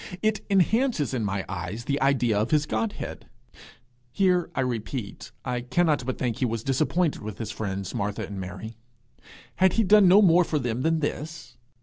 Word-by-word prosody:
It 215 -1 +1
enhances 200 - +2
in 120 -4 -1
my 100 -1 -2
eyes 95 +5 -5
the 140 0 -1
idea 125 -5 +2
of 110 - 0
his 150 -1 +2
Godhead. 110 -3 -4 0.8
Here, 180 0 +2
I - - +1
repeat, 120 -3 -4
I 125 -1 -2
cannot 145 +1 +1
but 130 - -2
think 120 -3 -2
that - - -11
he 130 - +2
was 115 -1 -2
disappointed 155 +5 0
with 110 -1 -7
his 110 - -5
friends 95 -3 -4
Martha 100 0 -2
and 100 -1 -7
Mary. 105 +5 -8 0.8
Had 190 0 +4
he 225 - +2
done 205 -1 +6
no 195 +4 +7
more 180 -1 +6
for 160 - -1
them 125 -3 -2
than 160 +2 +1
this? 155 +2 -5
130 Hz, 185 wpm, -26 LUFS, 110-170 Hz, 0.8 s, no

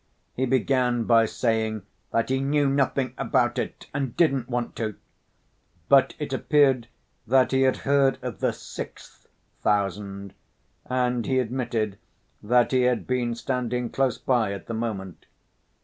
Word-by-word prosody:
He 130 +1 -1
began 125 -1 +1
by 115 0 +4
saying 110 -3 -1 0.3
that 115 +1 0
"he 130 0 +1
knew 140 +1 +2
nothing 135 -1 +1
about - - +1
it - - -5
and 135 -4 -3
didn't 135 -8 +2
want 120 -1 -2
to." 110 -3 -3 0.9
But 135 -1 +5
it 150 -3 -4
appeared 135 -3 +3 0.4
that 130 +2 +4
he 130 0 +2
had 130 -1 +3
heard 140 -1 +3
of 125 -5 -5
the - - +1
"sixth" - - -10 0.3
thousand, 100 -1 -1 0.5
and 125 -2 0
he 130 - +1
admitted 115 -5 -1 0.4
that 120 +3 +3
he 130 -1 +3
had 125 -1 +1
been 125 -2 -1
standing 125 -1 -2
close 135 -4 +1
by 120 -6 +1
at 100 - -8
the 115 - -5
moment. 105 -5 -5
125 Hz, 145 wpm, -25 LUFS, 115-130 Hz, 0.9 s, But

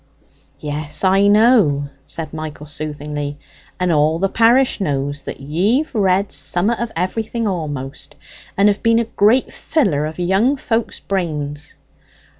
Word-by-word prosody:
"Yes, 150 +2 -3
I 195 +1 +4
know," 205 - +4 0.2
said 165 -1 -6
Michael 155 -1 -6
soothingly, 150 -1 -5 0.4
"and 180 -1 +1
all 155 +1 +3
the 195 +3 0
parish 235 +2 +3
knows, 145 -3 -2
that - - -7
ye've 195 - 0
read 195 -2 +2
sommat 205 +7 0
of 235 -1 -3
everything 220 +6 -2
a'most, 145 -8 -4 0.4
and 200 +1 +5
have 205 -1 +1
been 230 0 +3
a 230 - +2
great 225 +4 +2
filler 170 - 0
of 155 - -8
young 195 +10 +2
folks' 230 -3 -2
brains. 155 -5 -3
180 Hz, 135 wpm, -19 LUFS, 150-220 Hz, 0.4 s, and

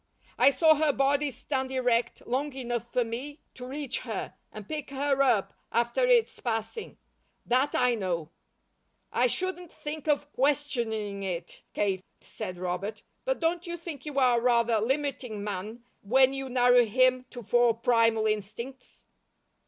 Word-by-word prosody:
I - - +8
saw 315 +4 +5
her 305 0 +2
body 280 +1 +2
stand 265 +1 -3
erect, 245 -2 0
long 275 +4 -1
enough 240 -3 -4
for 250 - +2
me 260 +6 -6
to 250 0 -9
reach 275 -1 -3
her, 225 -5 -5 0.2
and 210 -2 -9
pick 300 -2 -5
her 275 0 0
up, 230 -7 +2 0.2
after 240 - +1
its 485 -2 +3
passing. 225 - -4 0.5
That 255 +4 +2
I 250 -1 +3
know." 175 -7 -2 0.8
"I 250 - +3
shouldn't 360 +4 -3
think 300 0 -7
of 290 0 0
questioning 235 -8 0
it, 180 -3 -5
Kate," 190 -2 0 0.2
said 185 -1 -7
Robert. 185 +4 -4 0.2
"But - - 0
don't 345 +1 0
you 345 0 -4
think 320 -5 -8
you 290 -2 -5
are 250 -3 +4
rather 235 -2 +3
limiting 250 -3 -2
man, 210 +4 -5 0.2
when 260 +5 +4
you 270 -1 -4
narrow 245 -1 +5
him 255 +3 +2
to 245 -2 -9
four 240 +2 +3
primal 230 -1 +3
instincts?" 220 +5 -4
250 Hz, 150 wpm, -28 LUFS, 225-280 Hz, 0.8 s, I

